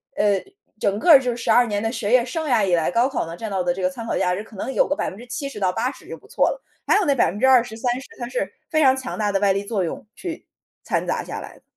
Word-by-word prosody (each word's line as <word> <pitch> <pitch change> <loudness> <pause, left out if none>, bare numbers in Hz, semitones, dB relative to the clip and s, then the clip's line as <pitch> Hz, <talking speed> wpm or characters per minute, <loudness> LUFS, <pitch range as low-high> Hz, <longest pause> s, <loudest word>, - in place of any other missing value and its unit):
呃 205 -2 +2 0.4
整 200 +1 0
个 315 +1 +8
就 255 -2 -1
是 235 - -5
12 240 +1 +4
年 205 -2 -2
的 225 0 -1
学 225 -3 -3
业 250 -1 +5
生 315 +5 -3
涯 230 -6 +3
以 175 - +3
来， 165 +1 0
高 235 +5 +3
考 265 - -2
呢 165 +1 -7
占 220 -2 -5
到 190 -2 -1
的 175 0 +1
这 190 - -6
个 185 - +2
参 230 +5 -8
考 - - -2
价 180 0 +1
值 205 - -5
可 220 - -16
能 260 - -4
有 - - +2
个 290 - 0
70%-80% 240 -4 -3
就 - - -6
不 420 - -20
错 480 - +2
了， - - -5 0.2
还 - - +4
有 395 - +1
那 280 - +3
20%，30%， 245 +3 +2
它 240 - -4
是 225 -6 -3 0.2
非 310 -1 +2
常 260 -1 +6
强 260 -2 -5
大 210 -1 0
的 195 - +1
外 200 -1 +3
力 200 +1 -2
作 200 -3 -1
用 170 - -5
去 345 -3 -7 0.4
掺 - - -1
杂 - - -1
下 - - -6
来 - - -10
的。 - - -22
230 Hz, 270 characters per minute, -22 LUFS, 200-260 Hz, 0.4 s, 个